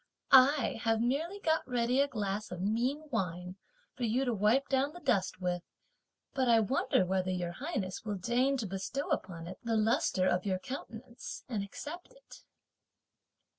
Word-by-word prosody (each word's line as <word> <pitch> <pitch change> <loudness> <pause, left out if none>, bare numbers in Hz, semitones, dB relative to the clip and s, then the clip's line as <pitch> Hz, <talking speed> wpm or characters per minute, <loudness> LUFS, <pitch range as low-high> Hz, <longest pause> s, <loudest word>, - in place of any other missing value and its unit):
I 265 -2 +6
have 225 -1 +2
merely 300 - -1
got 320 -4 +2
ready 245 +1 +2
a 285 - +3
glass 210 -5 -3
of 180 - -6
mean 240 +10 0
wine 180 -4 -3 0.4
for - - -13
you 240 +4 +1
to 245 - 0
wipe 220 +7 +3
down 275 +2 +1
the 350 - -9
dust 225 - 0
with, 180 -1 -1 0.7
but 260 -2 +1
I 230 -1 +6
wonder, 235 -2 +2
whether 185 0 0
Your 180 -2 -2
Highness 195 - -4
will 210 -2 -2
deign 250 +8 +1
to 235 - -2
bestow 195 +9 -3
upon 165 -3 -2
it 180 +2 -8
the 230 -1 0
lustre 215 -4 +2
of 180 0 +1
your 190 -2 0
countenance, 235 +2 -8
and 220 -6 -2
accept 340 - -8
it." - - -16
230 Hz, 170 wpm, -32 LUFS, 190-270 Hz, 0.7 s, I